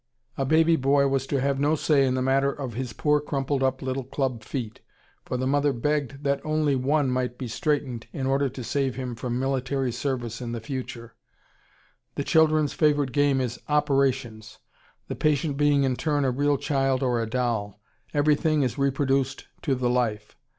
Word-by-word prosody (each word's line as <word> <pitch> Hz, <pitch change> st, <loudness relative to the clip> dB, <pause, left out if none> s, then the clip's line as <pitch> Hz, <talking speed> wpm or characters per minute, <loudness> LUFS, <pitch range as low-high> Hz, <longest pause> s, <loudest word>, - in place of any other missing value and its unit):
A 135 Hz, -, -1 dB
baby 160 Hz, +3 st, +4 dB
boy 140 Hz, +1 st, +3 dB
was 135 Hz, -1 st, -1 dB
to 140 Hz, -, 0 dB
have 135 Hz, +1 st, 0 dB
no 145 Hz, +2 st, +2 dB
say 145 Hz, -3 st, +3 dB
in 130 Hz, -, 0 dB
the 130 Hz, -, 0 dB
matter 135 Hz, +1 st, +2 dB
of 135 Hz, -4 st, -6 dB
his 125 Hz, +1 st, -4 dB
poor 150 Hz, +5 st, +2 dB
crumpled 140 Hz, -1 st, -2 dB
up 130 Hz, 0 st, 0 dB
little 130 Hz, +1 st, -2 dB
club 130 Hz, -3 st, -3 dB
feet, 115 Hz, -2 st, -5 dB, 0.4 s
for 125 Hz, -, -3 dB
the 130 Hz, -, -2 dB
mother 145 Hz, +2 st, +2 dB
begged 140 Hz, +2 st, -2 dB
that 140 Hz, -1 st, 0 dB
only 155 Hz, -2 st, +1 dB
one 135 Hz, +1 st, +1 dB
might 125 Hz, -1 st, -1 dB
be 125 Hz, -, -5 dB
straightened, 130 Hz, -2 st, -2 dB
in 135 Hz, -, -4 dB
order 135 Hz, +1 st, +1 dB
to 125 Hz, -, -8 dB
save 135 Hz, 0 st, -1 dB
him 130 Hz, -1 st, -4 dB
from 120 Hz, +1 st, -3 dB
military 135 Hz, 0 st, -1 dB
service 120 Hz, -2 st, -3 dB
in 120 Hz, -1 st, -4 dB
the 115 Hz, -, -3 dB
future.... 120 Hz, -1 st, -6 dB, 1.0 s
The 140 Hz, -, -2 dB
children's 155 Hz, -1 st, +3 dB
favorite 145 Hz, -4 st, +2 dB
game 145 Hz, 0 st, +2 dB
is 125 Hz, -2 st, -3 dB
"operations," 135 Hz, -7 st, 0 dB, 0.5 s
the -, -, -3 dB
patient 150 Hz, -1 st, 0 dB
being 145 Hz, -1 st, +3 dB
in 130 Hz, -2 st, +1 dB
turn 145 Hz, 0 st, 0 dB
a 130 Hz, -, +2 dB
real 145 Hz, +2 st, +1 dB
child 135 Hz, -1 st, 0 dB
or 120 Hz, -2 st, +1 dB
a 115 Hz, -, -3 dB
doll. 110 Hz, -4 st, -2 dB, 0.3 s
Everything 150 Hz, 0 st, +2 dB
is 130 Hz, +2 st, -2 dB
reproduced 135 Hz, -1 st, 0 dB, 0.2 s
to 135 Hz, -4 st, 0 dB
the 125 Hz, -1 st, -1 dB
life. 110 Hz, -4 st, -1 dB
135 Hz, 185 wpm, -25 LUFS, 125-145 Hz, 1.0 s, baby